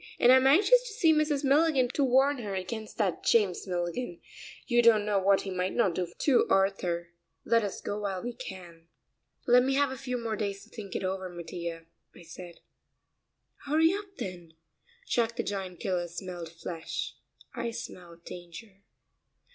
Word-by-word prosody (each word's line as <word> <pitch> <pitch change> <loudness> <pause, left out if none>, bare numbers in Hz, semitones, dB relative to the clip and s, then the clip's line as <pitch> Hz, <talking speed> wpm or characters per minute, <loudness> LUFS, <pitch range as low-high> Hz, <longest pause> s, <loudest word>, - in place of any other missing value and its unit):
And 245 - +7
I'm 260 0 +6
anxious 420 - +6
to 430 - -7
see 335 -7 +4
Mrs. 305 -2 +1
Milligan 280 -1 +4
to 280 - 0
warn 270 +2 +3
her 205 -4 -4
against 215 +4 -5
that 200 -5 0
James 200 -5 +2
Milligan. 175 +2 -3 0.5
You 240 -2 +3
don't 225 -3 +5
know 205 -2 +2
what 195 +1 +3
he 195 - -5
might 185 0 -2
not 195 -7 +2
do 175 0 -3
to 275 -5 +3
Arthur. 180 -3 +1 0.4
Let 230 -1 +3
us 200 - -4
go 205 - -3
while 195 -3 -3
we 245 0 -4
can." 180 -9 -10 0.6
"Let 245 0 +6
me 270 +2 +1
have 285 -1 +2
a 265 - -5
few 250 -1 -3
more 230 -2 -3
days 200 -2 -3
to - - -19
think 205 -5 -8
it - - -2
over, 190 0 -3
Mattia," 170 -1 -6 0.3
I - - -13
said. 170 +1 -11 1.0
"Hurry 320 +4 +3
up, 400 -1 -7
then. 175 -3 -7 0.5
Jack 235 -1 +1
the - - -2
Giant 190 -3 -5
Killer 180 -3 -1
smelled 175 -1 -7
flesh 165 0 -5 0.4
I 235 - -3
smell 175 -6 -8
danger." 180 +3 -10
200 Hz, 170 wpm, -29 LUFS, 180-255 Hz, 1.0 s, And